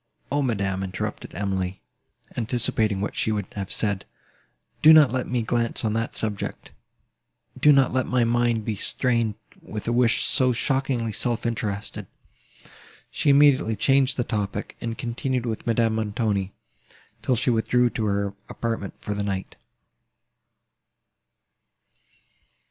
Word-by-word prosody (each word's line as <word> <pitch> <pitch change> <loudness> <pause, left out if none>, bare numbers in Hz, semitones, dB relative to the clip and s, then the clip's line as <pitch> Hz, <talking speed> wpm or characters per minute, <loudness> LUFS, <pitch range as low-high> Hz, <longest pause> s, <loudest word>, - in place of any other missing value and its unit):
"O, 145 +1 +1
madam!" 100 -7 -1
interrupted 95 -1 -5
Emily, 95 -2 -2 0.6
anticipating 110 -3 0
what 105 - -3
she 110 - 0
would 105 -3 -1
have 100 -2 -5
said, 100 -3 0 0.8
"do 155 +1 +9
not 150 -5 +7
let 130 0 -2
me 125 -2 -1
glance 115 0 -1
on 105 - +1
that 115 +1 -2
subject: 105 -3 -4 0.9
do 150 - +6
not 135 -3 +4
let 130 -1 +1
my 125 -1 +2
mind 120 -1 +1
be 110 - -1
stained 115 0 +1 0.3
with 105 0 -7
a 120 - +1
wish 120 -1 +3
so 130 -2 +3
shockingly 130 -2 0
self 120 +2 -1
interested." 110 -3 -3 1.0
She 160 -3 0
immediately 140 -5 +5
changed 135 +4 +2
the 125 - +1
topic, 105 -3 -3
and 115 -1 -4
continued 125 +1 -2
with 115 0 -4
Madame 115 -1 +2
Montoni, 105 -3 -1 0.7
till 130 - +1
she 125 +2 +1
withdrew 120 +1 +2
to 110 - -2
her 100 -1 -1 0.2
apartment 115 -4 -4
for 105 - -4
the 105 - -3
night. 95 -2 -3
115 Hz, 135 wpm, -24 LUFS, 105-125 Hz, 1.0 s, do